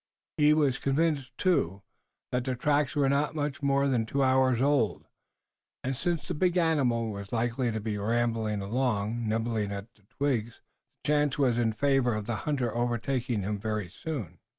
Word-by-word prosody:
He 150 Hz, 0 st, +5 dB
was 140 Hz, -4 st, +2 dB
convinced, 140 Hz, -3 st, 0 dB
too, 100 Hz, -, +1 dB, 0.5 s
that 125 Hz, 0 st, 0 dB
the 130 Hz, 0 st, -2 dB
tracks 145 Hz, +2 st, +1 dB
were 145 Hz, -2 st, +3 dB
not 140 Hz, +3 st, +1 dB
much 145 Hz, -2 st, -2 dB
more 140 Hz, 0 st, +2 dB
than 120 Hz, -5 st, +1 dB
two 140 Hz, +4 st, +1 dB
hours 130 Hz, -2 st, +3 dB
old, 135 Hz, -5 st, +1 dB, 0.8 s
and 130 Hz, +1 st, -1 dB
since 170 Hz, +5 st, -2 dB
the -, -, -2 dB
big 180 Hz, +3 st, +1 dB
animal 130 Hz, -10 st, +2 dB
was 100 Hz, 0 st, -7 dB
likely 120 Hz, +1 st, 0 dB
to 110 Hz, -, -2 dB
be 105 Hz, -1 st, -3 dB
rambling 110 Hz, -1 st, 0 dB
along, 115 Hz, 0 st, -1 dB
nibbling 110 Hz, -2 st, -1 dB
at 100 Hz, +3 st, -7 dB
the 105 Hz, -, -29 dB
twigs, 120 Hz, -5 st, -1 dB, 0.4 s
the -, -, -6 dB
chance 150 Hz, -1 st, +2 dB
was 125 Hz, -4 st, +2 dB
in 115 Hz, -2 st, +1 dB
favor 135 Hz, 0 st, +2 dB
of 105 Hz, -1 st, -3 dB
the 115 Hz, +1 st, -2 dB
hunter 130 Hz, -6 st, 0 dB
overtaking 120 Hz, -1 st, -1 dB
him 105 Hz, +1 st, -2 dB
very 105 Hz, -3 st, -3 dB
soon. 100 Hz, -, -6 dB
125 Hz, 175 wpm, -29 LUFS, 110-140 Hz, 0.8 s, He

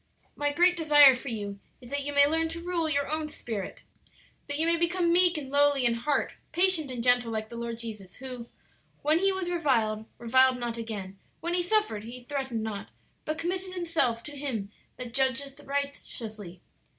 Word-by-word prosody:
My 290 Hz, 0 st, 0 dB
great 355 Hz, +4 st, +4 dB
desire 295 Hz, -4 st, +7 dB
for 250 Hz, +2 st, -6 dB
you 205 Hz, -3 st, -5 dB, 0.2 s
is 245 Hz, 0 st, -13 dB
that 285 Hz, 0 st, -1 dB
you 290 Hz, -, -3 dB
may 285 Hz, 0 st, +6 dB
learn 325 Hz, +2 st, +1 dB
to 330 Hz, +1 st, -5 dB
rule 345 Hz, -3 st, 0 dB
your 285 Hz, -1 st, 0 dB
own 310 Hz, 0 st, -2 dB
spirit; 220 Hz, -9 st, -6 dB, 0.6 s
that 285 Hz, 0 st, -2 dB
you 320 Hz, -, +2 dB
may 335 Hz, 0 st, +4 dB
become 340 Hz, 0 st, +1 dB
meek 355 Hz, -1 st, +5 dB
and 275 Hz, -3 st, -6 dB
lowly 285 Hz, -2 st, +4 dB
in 235 Hz, -, +4 dB
heart, 240 Hz, +6 st, -1 dB, 0.2 s
patient 355 Hz, -5 st, +4 dB
and 245 Hz, -2 st, -4 dB
gentle 245 Hz, -1 st, +3 dB
like 220 Hz, -1 st, -3 dB
the 235 Hz, -, -9 dB
Lord 235 Hz, 0 st, -4 dB
Jesus, 210 Hz, -5 st, -8 dB
'who 250 Hz, -2 st, -7 dB, 0.6 s
when 305 Hz, +3 st, +3 dB
He 390 Hz, +1 st, +3 dB
was 375 Hz, -2 st, -2 dB
reviled, 225 Hz, -10 st, +1 dB
reviled 260 Hz, +2 st, +4 dB
not 240 Hz, -2 st, -3 dB
again; 205 Hz, -4 st, -6 dB, 0.2 s
when 340 Hz, +2 st, -2 dB
He 355 Hz, -, +3 dB
suffered, 355 Hz, -, +1 dB
He 245 Hz, +2 st, -9 dB
threatened 265 Hz, -4 st, -3 dB
not; 210 Hz, -2 st, -5 dB, 0.4 s
but 310 Hz, 0 st, -2 dB
committed 370 Hz, +3 st, -3 dB
Himself 325 Hz, -10 st, +1 dB
to 295 Hz, -, -9 dB
Him 240 Hz, -8 st, -4 dB, 0.3 s
that 245 Hz, -2 st, -7 dB
judgeth 270 Hz, +2 st, -1 dB
righteously.' 230 Hz, -10 st, -5 dB
275 Hz, 185 wpm, -28 LUFS, 235-325 Hz, 0.6 s, desire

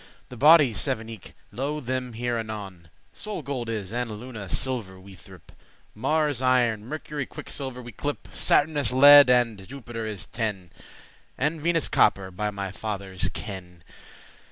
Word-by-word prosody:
The 125 Hz, -, -9 dB
bodies 140 Hz, -4 st, +6 dB
sev'n 115 Hz, -3 st, -2 dB
eke, 110 Hz, -5 st, -11 dB, 0.2 s
lo 140 Hz, +7 st, -3 dB
them 130 Hz, -2 st, -3 dB
here 120 Hz, +1 st, -2 dB
anon. 100 Hz, -6 st, -7 dB, 0.2 s
Sol 210 Hz, -7 st, -6 dB
gold 125 Hz, -4 st, -4 dB
is, 105 Hz, -3 st, -4 dB
and 120 Hz, 0 st, -2 dB
Luna 110 Hz, -2 st, -8 dB
silver 110 Hz, -6 st, -2 dB
we 95 Hz, +1 st, -14 dB
threpe* 90 Hz, -, -15 dB
*name -, -, -26 dB, 0.4 s
<9> 105 Hz, -, -16 dB
Mars 150 Hz, -3 st, +1 dB
iron, 120 Hz, -4 st, +2 dB
Mercury 150 Hz, -1 st, -5 dB
quicksilver 130 Hz, -3 st, -6 dB
we 120 Hz, -, -9 dB
clepe;* 145 Hz, +7 st, -4 dB
*call -, -, -17 dB
Saturnus 145 Hz, -5 st, +2 dB
lead, 145 Hz, +1 st, +9 dB
and 115 Hz, -6 st, +2 dB
Jupiter 120 Hz, -4 st, -7 dB
is 105 Hz, -4 st, -5 dB
tin, 105 Hz, -7 st, -4 dB, 0.7 s
And 155 Hz, +1 st, -1 dB
Venus 165 Hz, -1 st, +1 dB
copper, 95 Hz, -1 st, +2 dB
by 105 Hz, +3 st, -2 dB
my 100 Hz, -1 st, -5 dB
father's 95 Hz, -4 st, -3 dB
kin. 90 Hz, -4 st, -8 dB
120 Hz, 155 wpm, -25 LUFS, 100-135 Hz, 0.7 s, lead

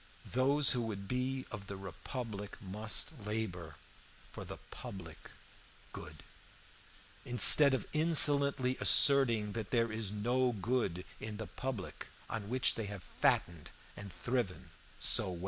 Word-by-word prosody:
Those 135 Hz, +3 st, +2 dB
who 125 Hz, -, -1 dB
would 100 Hz, -4 st, -7 dB
be 130 Hz, +3 st, -4 dB
of 105 Hz, -5 st, -9 dB
the 100 Hz, -, -8 dB
republic 100 Hz, +3 st, -8 dB
must 105 Hz, +6 st, -1 dB
labor 95 Hz, -7 st, -6 dB, 0.6 s
for -, -, -9 dB
the -, -, -10 dB
public 85 Hz, -5 st, -11 dB, 0.6 s
good, -, -, -11 dB, 1.0 s
instead 135 Hz, +3 st, +8 dB
of -, -, -5 dB
insolently 140 Hz, -4 st, +3 dB
asserting 120 Hz, -7 st, +4 dB
that 110 Hz, -1 st, -7 dB
there 115 Hz, -2 st, -1 dB
is 110 Hz, -2 st, -5 dB
no 120 Hz, +4 st, -1 dB
good 100 Hz, -4 st, -3 dB
in 110 Hz, -1 st, -8 dB
the 110 Hz, -, -7 dB
public 125 Hz, -7 st, -8 dB, 0.2 s
on 105 Hz, -3 st, -6 dB
which 130 Hz, +1 st, 0 dB
they 110 Hz, -, -6 dB
have 100 Hz, -3 st, -9 dB
fattened 85 Hz, -1 st, -2 dB, 0.3 s
and 100 Hz, -2 st, -10 dB
thriven 100 Hz, +2 st, -5 dB, 0.3 s
so 95 Hz, -, +1 dB
well. 85 Hz, -, -9 dB
110 Hz, 130 wpm, -32 LUFS, 100-130 Hz, 1.0 s, instead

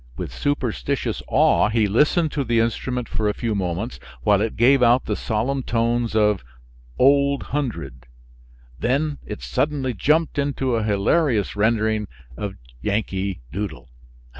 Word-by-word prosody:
With -, -, -5 dB
superstitious 120 Hz, -, -2 dB
awe -, -, +4 dB
he 110 Hz, -1 st, +2 dB
listened 150 Hz, -, +2 dB
to 140 Hz, -, -1 dB
the 120 Hz, -2 st, +1 dB
instrument 120 Hz, +2 st, -1 dB
for 110 Hz, -1 st, -1 dB
a 105 Hz, -, -2 dB
few 115 Hz, -2 st, -2 dB
moments, 95 Hz, +4 st, -3 dB, 0.2 s
while 105 Hz, -2 st, +4 dB
it 110 Hz, 0 st, -1 dB
gave 130 Hz, +3 st, +4 dB
out 120 Hz, +1 st, +4 dB
the 105 Hz, -, -1 dB
solemn 125 Hz, +7 st, -1 dB
tones 115 Hz, -1 st, 0 dB
of 105 Hz, -, +2 dB, 0.5 s
"Old 140 Hz, +1 st, +4 dB
Hundred," 85 Hz, -, -3 dB, 0.7 s
then 140 Hz, +4 st, 0 dB
it 105 Hz, -, -7 dB
suddenly 140 Hz, -4 st, -1 dB
jumped 150 Hz, -, +1 dB
into 135 Hz, -2 st, 0 dB
a 115 Hz, -, 0 dB
hilarious 105 Hz, -, +1 dB
rendering 110 Hz, 0 st, +1 dB, 0.3 s
of 100 Hz, +7 st, -5 dB, 0.3 s
"Yankee 100 Hz, -, -2 dB
Doodle." 80 Hz, -9 st, -5 dB
115 Hz, 140 wpm, -22 LUFS, 105-135 Hz, 0.7 s, awe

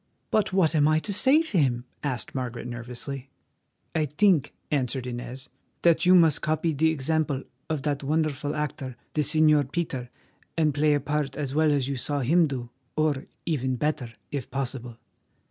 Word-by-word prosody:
"But 215 Hz, -3 st, +2 dB
what 185 Hz, -4 st, +3 dB
am 150 Hz, -2 st, +4 dB
I 155 Hz, 0 st, +4 dB
to 200 Hz, +6 st, -2 dB
say 270 Hz, +10 st, +5 dB
to 220 Hz, -, +1 dB
him?" 125 Hz, -4 st, +1 dB, 0.2 s
asked 130 Hz, -5 st, -3 dB
Margaret 125 Hz, -3 st, -4 dB
nervously. 125 Hz, +3 st, -6 dB, 0.6 s
"I 155 Hz, -2 st, +1 dB
think," 170 Hz, +1 st, +3 dB, 0.2 s
answered 130 Hz, -3 st, 0 dB
Inez, 125 Hz, +2 st, -6 dB, 0.4 s
"that 170 Hz, +1 st, +4 dB
you 185 Hz, -, +8 dB
must 165 Hz, -5 st, +5 dB
copy 155 Hz, +1 st, 0 dB
the 160 Hz, +3 st, +3 dB
example 155 Hz, -2 st, 0 dB, 0.3 s
of 155 Hz, -4 st, -2 dB
that 145 Hz, -1 st, -1 dB
wonderful 150 Hz, -1 st, 0 dB
actor, 140 Hz, -4 st, -3 dB, 0.2 s
the 155 Hz, -, +1 dB
Señor 150 Hz, -2 st, +4 dB
Peter, 135 Hz, -8 st, -3 dB, 0.5 s
and 155 Hz, -2 st, +3 dB
play 150 Hz, +1 st, +3 dB
a -, -, +1 dB
part 145 Hz, -1 st, -2 dB
as 140 Hz, -3 st, -2 dB
well 155 Hz, 0 st, +3 dB
as 140 Hz, -3 st, +1 dB
you 140 Hz, -1 st, -2 dB
saw 145 Hz, +3 st, -1 dB
him 165 Hz, +6 st, +4 dB
do, 125 Hz, -4 st, -5 dB, 0.2 s
or 155 Hz, -3 st, 0 dB, 0.2 s
even 130 Hz, -5 st, 0 dB
better, 150 Hz, -3 st, -1 dB, 0.2 s
if 140 Hz, -3 st, -4 dB
possible." 125 Hz, -3 st, -4 dB
145 Hz, 170 wpm, -26 LUFS, 130-155 Hz, 0.6 s, you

